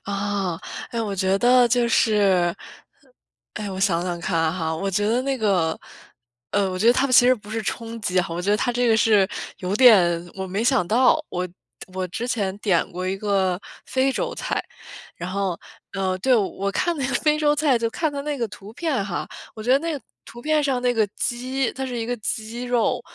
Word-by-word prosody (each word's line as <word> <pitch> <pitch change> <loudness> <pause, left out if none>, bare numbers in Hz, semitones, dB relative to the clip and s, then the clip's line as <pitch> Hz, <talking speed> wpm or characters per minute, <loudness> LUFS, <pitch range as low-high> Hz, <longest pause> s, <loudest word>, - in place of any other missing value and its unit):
啊， 200 -3 -2 0.3
哎， 235 - -2
我 210 -3 -2
觉 190 0 +1
得 245 +2 +5
就 240 0 +2
是， 195 -7 +3 1.0
哎， 210 -1 -4
我 190 - -5
想 180 -4 +2
想 175 -1 -3
看 165 -2 0
哈。 160 -3 -2
我 195 +4 -2
觉 205 +2 0
得 235 +4 +1
那 270 0 -1
个， 185 -8 +1 0.7
呃， 200 -2 +1
我 185 - -4
觉 210 - +1
得 240 - +8
它 260 +2 +2
的 260 - -4
其 245 - +7
实 255 - +6
不 210 -3 -13
是 225 0 -2
冲 230 +2 -5
击， 185 -3 0
我 170 +1 -4
觉 190 +3 -1
得 210 - +4
它 245 +3 0
这 245 0 +1
个 225 - +4
是 210 -4 +4 0.3
有 185 +1 -2
点， 180 -8 +5
我 190 0 -5
没 195 +4 -2
想 245 -6 +2
到。 250 - +3
我 180 0 -3 0.5
我 185 -1 -2
之 225 +7 -4
前 200 -6 -1
点 190 -6 +1
过 180 +1 -4
一 190 - -1
个 195 -3 0 0.3
非 265 +1 +1
洲 485 - -2
菜。 - - -2 0.5
然 180 +2 -5
后， 195 -3 -2 0.4
呃， 190 -1 -1
对， 255 +7 +3
我 200 -2 0
看 345 - 0
那 275 -3 -1
个 270 - -2
非 305 0 +2
洲 295 -1 +3
菜， 290 -5 +3
就 230 0 0
看 315 +4 -1
它 280 - -4
那 295 0 -3
个 240 -3 -1
图 200 +1 -11
片 275 -5 -1
哈， 195 -4 -4 0.3
我 220 - -8
觉 240 - -1
得 270 - +5
那 330 +3 -3
个 290 - -4 0.3
图 240 - -11
片 310 +1 +2
上 270 -3 0
那 250 -1 +2
个 220 -3 +2
鸡， 255 +1 -1
它 265 0 -4
是 250 -2 -4
一 225 - -2
个 245 +2 -2
鸡 220 +3 -4
肉， 245 -2 +1
215 Hz, 235 characters per minute, -23 LUFS, 190-250 Hz, 1.0 s, 得